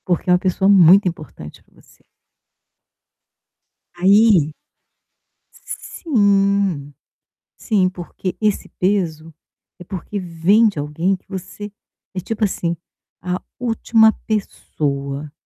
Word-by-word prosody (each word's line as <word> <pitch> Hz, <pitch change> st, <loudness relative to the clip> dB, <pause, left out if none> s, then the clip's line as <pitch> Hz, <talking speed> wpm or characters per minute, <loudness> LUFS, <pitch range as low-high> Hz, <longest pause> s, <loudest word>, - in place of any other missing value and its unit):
Porque 180 Hz, 0 st, -1 dB
é -, -, +6 dB
uma 180 Hz, -, +4 dB
pessoa 190 Hz, 0 st, 0 dB
muito 190 Hz, 0 st, +6 dB
importante 155 Hz, -, -8 dB
pra -, -, -31 dB
você. -, -, -25 dB, 1.9 s
Aí 190 Hz, -3 st, +4 dB, 1.1 s
Sim, 200 Hz, -, 0 dB, 0.6 s
sim, 200 Hz, -5 st, +1 dB
porque 185 Hz, +1 st, -6 dB
esse 210 Hz, -2 st, 0 dB
peso 165 Hz, -5 st, -1 dB, 0.4 s
é 180 Hz, -, -11 dB
porque 190 Hz, +3 st, -6 dB
vem 185 Hz, +6 st, +3 dB
de 195 Hz, -, -5 dB
alguém 165 Hz, +6 st, -1 dB
que -, -, -28 dB
você 195 Hz, +2 st, -8 dB, 0.4 s
é 185 Hz, -, -2 dB
tipo 220 Hz, +4 st, -2 dB
assim, 170 Hz, -4 st, -2 dB, 0.5 s
a 180 Hz, +1 st, -2 dB, 0.2 s
última 225 Hz, -2 st, +3 dB
pessoa 145 Hz, -8 st, -3 dB
185 Hz, 105 wpm, -19 LUFS, 165-205 Hz, 1.9 s, é